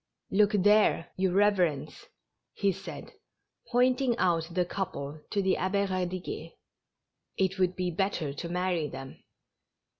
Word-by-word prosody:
" - - -40
Look 210 +2 +4
there, 205 -3 +4
your 185 -1 +1
reverence," 180 -8 +1 0.5
he 200 -1 +2
said, 195 +1 -8 0.6
pointing 250 0 +3
out 165 -5 +2
the 180 0 +1
couple 155 -6 -4
to 200 -2 0
tlie 190 - +3
Abbe 200 +2 0
Eadiguet. 185 -1 -4 0.8
''It 190 0 0
would 185 -1 +2
be 180 -1 -1
better 170 -5 -1
to 170 +4 -6
marry 180 -3 0
them." 135 -1 -9
185 Hz, 130 wpm, -29 LUFS, 170-200 Hz, 0.8 s, Look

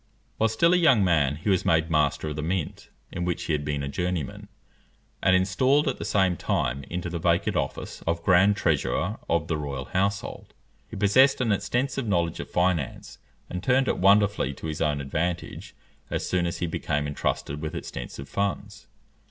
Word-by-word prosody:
While 110 - +2
still 170 +11 +3
a - - +5
young 135 - +5
man, 75 -6 +2
he 80 +7 -8
was 95 - +2
made 80 0 +2
master 75 0 +1
of 75 - -5
the 75 - -3
mint, 85 +1 -3 0.2
in 90 - -4
which 90 -1 -2
he 80 - -1
had 75 -1 -1
been 75 -1 -2
a - - -3
journeyman, 90 -1 -3 0.7
and 95 - +4
installed 130 +11 +2
at 135 - -1
the - - -4
same 95 -3 +2
time 70 -9 -1
into 90 0 -3
the 85 0 -4
vacant 85 0 +1
office - - -3
of 85 0 -1
grand 95 +3 +5
treasurer 100 +1 0
of 85 -1 +1
the 80 - -1
royal 70 -3 -4
household. 100 +3 -2 0.3
He - - -8
possessed 130 +8 +4
an 120 -4 +1
extensive 125 +5 -1
knowledge 85 -4 0
of - - -6
finance, 90 -6 -1 0.3
and 90 - -5
turned 130 +1 +3
it - - 0
wonderfully 100 -7 +3
to - - -9
his 80 -2 -4
own 75 -1 +1
advantage, 85 +5 -3 0.3
as - - -2
soon 90 -2 +1
as 85 - -3
he - - -2
became 75 -3 -2
entrusted 75 0 -3
with 80 +2 -4
extensive 70 -3 -7
funds. 100 +8 -3
85 Hz, 185 wpm, -26 LUFS, 75-100 Hz, 0.7 s, a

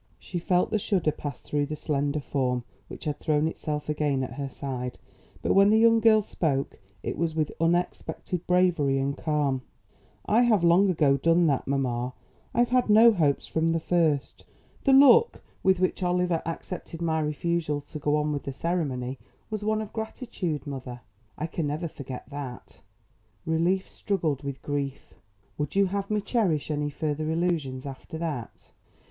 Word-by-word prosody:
She 175 - -5
felt 180 +1 +1
the 215 - +2
shudder 185 -6 +1
pass 145 -3 -7
through 145 -1 -1
the 155 - -4
slender 145 -1 -1
form 125 -3 -1 0.2
which - - -10
had 150 -1 -2
thrown 155 -1 +1
itself 150 -2 -4
again 145 -3 0
at 130 - -5
her 140 +1 -4
side; 125 -2 -5 0.5
but - - +2
when 195 +1 +6
the 215 - +5
young 230 0 +5
girl 220 -1 +5
spoke 140 - -2 0.2
it - - -4
was 165 -1 0
with 155 -2 0
unexpected 175 +1 -1
bravery 175 -7 +3
and 135 +1 -1
calm. 145 -4 0 0.6
"I 225 +3 +4
have 220 -7 +3
long 175 +4 +5
ago 150 -6 +3
done 165 +4 +3
that, 140 -4 +1
mamma. 125 -2 -1 0.4
I've 240 0 +2
had 250 -2 +2
no 225 +3 +8
hopes 150 -7 +1
from 165 +1 0
the 165 - +1
first. 160 -4 0 0.4
The 275 - +5
look 285 - +6 0.2
with 190 -1 +3
which 185 +1 0
Oliver 180 -2 +1
accepted 165 0 -6
my 160 -2 0
refusal 155 0 -1
to 150 +2 -9
go 150 0 +1
on 150 0 0
with 145 -1 -2
the 135 - -4
ceremony 135 -6 -2 0.3
was 215 -1 -3
one 215 +1 0
of 210 - -11
gratitude, 220 - -4
mother. 130 -3 -6 0.4
I 150 - -2
can 165 -1 -2
never 155 +4 -2
forget 135 -4 -8
that. 140 -3 -8 0.7
Relief 170 +4 +1
struggled 160 -9 -2
with 140 -2 -6
grief. 140 -1 -4 0.5
Would 150 +2 -3
you 200 0 +5
have 195 +1 -3
me 210 -1 +1
cherish 185 - 0
any 145 0 -1
further 155 +1 -2
illusions 160 -6 -1
after 140 +3 -7
that?" 155 -8 -5
155 Hz, 170 wpm, -27 LUFS, 140-180 Hz, 0.7 s, no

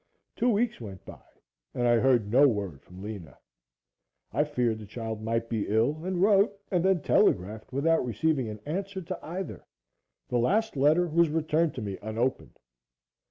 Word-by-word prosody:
Two 245 +2 +1
weeks 220 - 0
went 95 -5 -9
by - - -11 0.5
and 120 0 +1
I 120 0 +5
heard 120 -5 +2
no 140 +4 +6
word 100 - -2
from 90 +2 -13
Lena. 100 -8 -8 1.0
I 145 - +3
feared 125 -6 -1
the 105 - -10
child 110 0 -5
might 115 +1 -1
be 115 -3 -2
ill 120 +9 +1
and 185 0 -2
wrote 200 +1 +4
and 180 -3 +2
then 190 -5 +2
telegraphed 105 +5 +1
without 160 +5 +2
receiving 125 +2 0
an 105 -1 -8
answer 190 +4 -4
to 185 +2 -5
either. 180 +4 -6 0.6
The 120 - 0
last 210 - +1
letter 150 +6 +4
was 170 0 +3
returned 155 +1 0
to 125 - -4
me 100 -2 -5
unopened. 115 +4 -2
130 Hz, 165 wpm, -28 LUFS, 110-170 Hz, 1.0 s, no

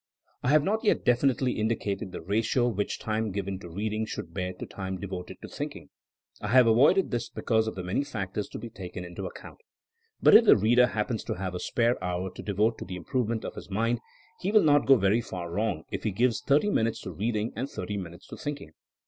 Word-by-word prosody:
I 125 - 0
have 150 0 +5
not 215 +7 0
yet 215 - +2
definitely 125 +1 +3
indicated 105 -3 -1
the - - -6
ratio 110 +6 +1
which 105 -4 -1
time 110 -1 -2
given 100 -1 -3
to 90 - -10
reading 110 +5 -2
should 85 -5 -6
bear 90 0 -2
to 90 - -7
time 95 -1 -5
devoted 95 -2 -6
to - - -6
thinking. - - -7 0.5
I 105 - -3
have 125 +3 +6
avoided 140 +12 +4
this 120 -1 -2
be - - -8
cause 110 -1 +2
of 110 - -3
the 95 - -5
many 90 +10 0
factors 105 -7 -4
to - - -7
be 115 - -8
taken 90 -2 -7
into 90 +2 -7
ac - - -9
count. - - -11 0.6
But - - +6
if 230 - +9
the - - +8
reader 120 +4 +5
happens 110 +1 -2
to - - -2
have 95 0 -4
a 90 - -3
spare 120 -1 0
hour 90 +1 -2
to - - -8
devote 105 +3 0
to - - -6
the 90 +1 -6
improvement 115 +5 -2
of - - -5
his - - -10
mind, 115 +4 0 0.4
he 190 - -1
will 215 -1 +6
not 145 -2 +4
go 135 - +8
very 105 +1 +2
far 90 -5 -6
wrong 100 -4 -1
if - - -4
he 110 - +1
gives 120 +4 +1
thirty 150 +9 +3
minutes 115 - +1
to 95 - -6
reading 110 +5 -2
and 130 +5 -3
thirty 95 -2 -5
minutes 85 -3 -7
to - - -8
thinking. 145 - -5
110 Hz, 230 wpm, -28 LUFS, 95-120 Hz, 0.6 s, if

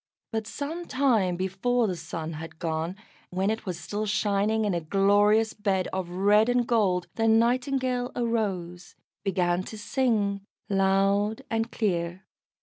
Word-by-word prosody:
But 220 -2 -2
some 320 +7 -5
time 235 -10 +2
before 190 +7 0
the 185 -4 -1
sun 165 0 -5
had 160 +1 -8
gone, 165 +1 -2 0.3
when 190 +3 0
it 220 -2 -5
was 175 -2 -3
still 205 +6 -3
shining 210 +1 +1
in 205 - 0
a 170 - -1
glorious 205 +5 +3
bed 195 -3 0
of 185 -2 -2
red 205 +5 +3
and 245 0 +2
gold, 195 -7 +2
the 225 0 +2
Nightingale 250 +2 +2
arose, 195 -7 -2 0.3
began 180 -2 +1
to 220 - -8
sing 210 -4 0 0.3
loud 195 +3 +2
and 225 +1 -1
clear. 180 -3 -2
205 Hz, 145 wpm, -27 LUFS, 185-225 Hz, 0.3 s, glorious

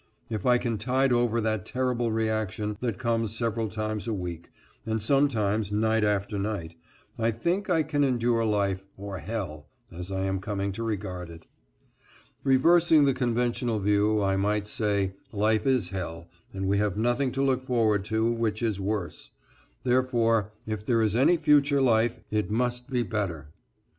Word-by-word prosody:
If 110 -1 -2
I 125 0 +6
can 115 -3 -2
tide 130 +3 +2
over 120 -1 +2
that 110 -3 -1
terrible 125 -1 -1
reaction 110 -1 -1
that 120 -5 -2
comes 115 -3 -1
several 115 -1 -1
times 110 +1 -3
a 110 - -1
week, 85 -3 -6 0.3
and 110 -1 -1
sometimes 110 -5 +1
night 110 +1 +2
after 105 0 0
night, 100 -5 -3 0.4
I 115 0 +2
think 170 - -1
I 165 -3 +3
can 145 -1 0
endure 120 -3 +1
life, 100 -3 0
or 100 -1 -6
hell, 90 -6 -5 0.2
as 90 +2 -7
I 95 0 -2
am 95 0 -1
coming 100 0 -2
to 100 - -6
regard 95 -5 -4
it. 80 -1 -12 1.0
Reversing 160 +3 +5
the 135 - +3
conventional 120 -2 0
view 105 +1 +2
I 95 0 +1
might 105 +1 0
say, 100 -3 0 0.2
"Life 110 +2 +1
is 125 -9 +2
hell, 85 -3 -5 0.2
and 95 0 -3
we 100 +1 +2
have 105 -2 0
nothing 120 +4 +1
to 135 +1 0
look 130 -2 +2
forward 115 -6 +1
to 110 +2 +1
which 115 -1 -1
is 105 -4 -1
worse, 100 -2 -3 0.5
therefore 115 -4 +2
if 110 -1 -4
there 115 0 +2
is 110 -1 +1
any 135 +8 +4
future 145 -2 +4
life, 120 -2 +2
it 105 -1 0
must 125 +3 -1
be 125 -2 0
better." 95 -9 -3
110 Hz, 165 wpm, -27 LUFS, 100-120 Hz, 1.0 s, I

